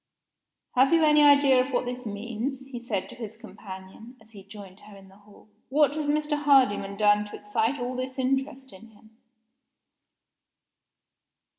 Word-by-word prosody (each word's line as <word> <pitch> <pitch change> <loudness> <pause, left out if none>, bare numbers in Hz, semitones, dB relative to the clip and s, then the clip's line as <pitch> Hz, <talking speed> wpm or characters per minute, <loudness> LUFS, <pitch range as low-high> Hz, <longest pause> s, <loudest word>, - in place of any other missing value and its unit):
"Have 260 +2 +3
you 330 -1 +4
any 300 -1 +5
idea 285 -3 +5
of 265 - -8
what 250 - -1
this 250 0 -6
means?" 235 +6 -5
he 260 -3 -8
said 225 -6 -4
to - - -11
his 225 -2 -9
companion, 205 +2 -12
as 220 0 -22
he 200 -3 -13
joined 200 -1 -13
her 210 -1 -15
in 195 -1 -16
the 190 - -19
hall. 205 0 -20 0.2
"What 290 +1 +3
has 305 -1 -3
Mr. 295 0 -1
Hardyman 230 -9 +2
done 210 0 +3
to 205 - -10
excite 220 +6 -1
all 245 +1 -4
this 255 +1 -5
interest 265 0 -2
in 190 +4 -14
him?" 220 0 -22
240 Hz, 165 wpm, -26 LUFS, 205-270 Hz, 0.2 s, any